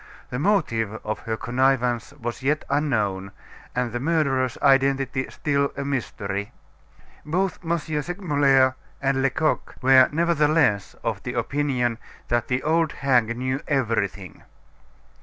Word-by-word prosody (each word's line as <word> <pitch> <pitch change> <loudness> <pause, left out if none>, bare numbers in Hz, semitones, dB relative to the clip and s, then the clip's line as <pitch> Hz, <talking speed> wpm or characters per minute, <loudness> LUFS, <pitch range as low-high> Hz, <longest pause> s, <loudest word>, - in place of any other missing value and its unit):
The 125 - -2
motive 140 - +1
of 110 - -2
her 110 0 -1
connivance 125 -2 +1
was 120 -4 -6
yet 145 +3 0
unknown, 105 -10 0 0.4
and 125 -1 -1
the 120 - -3
murderer's 135 -4 +1
identity 135 -1 +2
still 140 -1 0
a 140 - -3
mystery. 100 -7 -3 0.7
Both 180 +5 -1
M. 170 0 0
Segmuller 145 -4 +1 0.3
and 135 -1 +1
Lecoq 135 +3 0
were 130 0 +6
nevertheless 150 - +2
of - - -2
the - - -5
opinion 130 -5 0 0.3
that 120 0 +1
the 125 0 -1
old 160 0 +1
hag 120 -4 +1
knew 130 +2 -2
everything. 110 -8 -1
135 Hz, 120 wpm, -24 LUFS, 120-145 Hz, 0.7 s, were